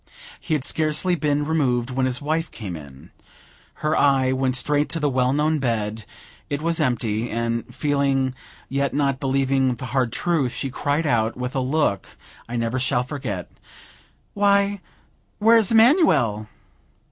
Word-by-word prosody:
He 155 - -1
had 140 -3 -3
scarcely 155 +3 0
been 150 -3 0
removed, 130 -6 0
when 130 0 0
his 125 +1 -2
wife 160 +2 -1
came 100 -6 -7
in. 70 -4 -12 0.7
Her 155 +1 +2
eye 135 -2 +3
went 130 -1 0
straight 145 +3 +1
to 165 - -2
the 145 -2 0
well 125 0 +2
known 150 +2 +1
bed; 110 -4 -2 0.4
it 145 - -2
was 165 +2 0
empty; 120 -5 -1
and 115 0 -2
feeling, 140 -3 0 0.3
yet 140 +1 -1
not 140 -2 +1
believing 135 -1 +1
the 130 - -7
hard 130 -4 +1
truth, 150 -4 0
she 135 - -3
cried 145 +4 -1
out, 115 -4 +1
with 125 0 -4
a - - +1
look 130 -5 -1 0.3
I 120 - -4
never 115 +2 -1
shall 125 -1 +1
forget: 125 -9 -5 0.8
"Why, 200 -1 +2 0.6
where's 225 -1 +4
Emanuel?" 220 - +4
135 Hz, 150 wpm, -22 LUFS, 120-155 Hz, 0.8 s, where's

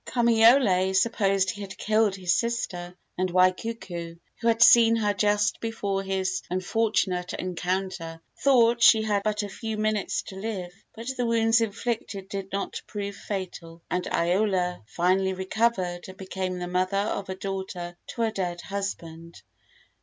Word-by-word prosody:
II. - - -8
Kamaiole 225 -5 +4
supposed 195 -3 +2
he 210 -2 -9
had 195 -1 -8
killed 215 -2 +2
his 180 -2 0
sister, 180 -7 -2 0.2
and 185 0 +1
Waikuku, 185 -2 0 0.2
who 230 - -1
had 230 +1 +5
seen 230 -1 +7
her 210 -2 +1
just 205 +1 +1
before 200 -4 -2
his 190 0 -1
unfortunate 185 -1 0
encounter, 180 -2 -3 0.2
thought 240 -4 +4
she 220 -1 +7
had 205 -2 +1
but 210 0 -1
a - - -3
few 220 +2 -5
minutes 215 -1 -1
to 190 - -10
live; 190 -4 -5 0.2
but 230 +1 -8
the 245 - 0
wounds 230 0 +3
inflicted 220 -3 -3
did 195 -1 -5
not 200 +1 -3
prove 200 -1 -5
fatal, 175 -5 -6
and 180 0 -1
Iola 180 - +1
finally 190 +5 +1
recovered 190 -2 -1
and 190 0 -11
became 185 -1 -4
the 180 0 -4
mother 185 +2 0
of 200 -1 -2
a 190 - -3
daughter 190 -2 -5
to 235 - -3
her 225 - +1
dead 175 -4 -3
husband. 170 -4 -6
195 Hz, 155 wpm, -26 LUFS, 185-220 Hz, 0.2 s, seen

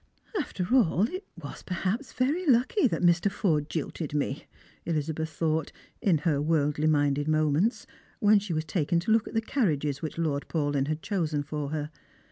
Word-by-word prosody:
" 420 - -5
After 185 -6 -3
all, 200 -7 +4
it 370 +8 -7
was 145 -4 -8
perhaps 190 +8 -2
very 300 +8 0
lucky 260 - +4
that 215 - -2
Mr. 175 +3 +4
Forde 160 -7 0
jilted 155 -1 -4
me," 145 -1 -2 0.4
Elizabeth 160 0 -2
thought 160 -1 -1 0.3
in 180 -6 +3
her 145 -4 +2
worldly 150 -1 +1
minded 145 -1 +2
moments, 155 - +1 0.3
when 210 -3 +5
she 200 -2 -6
was 155 -1 -1
taken 165 +1 0
to 200 - -1
look 225 0 +3
at - - -8
the 225 - +3
carriages 150 - 0
which 155 - -5
Lord 150 -4 -1
Paulyn 145 -3 0
had 155 +1 -3
chosen 160 -8 -1
for 150 -1 -4
her. 150 0 -3
160 Hz, 175 wpm, -28 LUFS, 150-205 Hz, 0.4 s, when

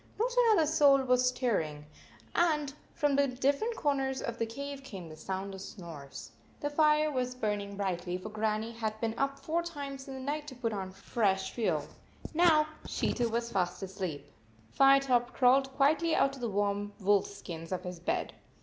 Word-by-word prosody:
Not 485 +3 0
another 445 -9 +5
soul 285 -3 +5
was 250 0 +3
stirring, 160 - -1 0.5
and 300 -5 +2 0.2
from 290 -1 +2
the 280 0 +4
different 280 - 0
corners 270 - 0
of 235 -1 -4
the 230 - 0
cave 280 +4 -6
came 190 -10 -8
the 155 - -10
sound 190 +4 -4
of 190 - -8
snores. 145 - -9 0.3
The 290 - -2
fire 305 0 +4
was 250 -2 -2
burning 205 -4 -2
brightly, 180 -2 -2
for 185 +4 -7
Grannie 215 +1 -1
had 220 -2 -4
been 225 -1 -1
up 275 +2 -1
four 330 +2 -1
times 280 -5 -6
in 270 - -6
the - - -6
night 295 +3 -3
to 265 - -8
put 235 -3 -2
on 190 -2 -3
fresh 190 -1 0
fuel. 230 -3 -1 0.5
Now 315 -2 +5 0.2
she - - 0
too 240 -2 0
was 235 +1 -2
fast 180 0 -1
asleep. 185 -6 -4 0.5
Firetop 270 -3 +4
crawled 265 +1 +4
quietly 315 +4 +3
out 275 - +3
of 270 - -10
the 235 - -1
warm 205 0 -1
wolf 200 0 +3
skins 165 -4 -8
of 185 -1 -2
his 180 -2 -6
bed. 175 - -2
245 Hz, 180 wpm, -31 LUFS, 200-280 Hz, 0.5 s, another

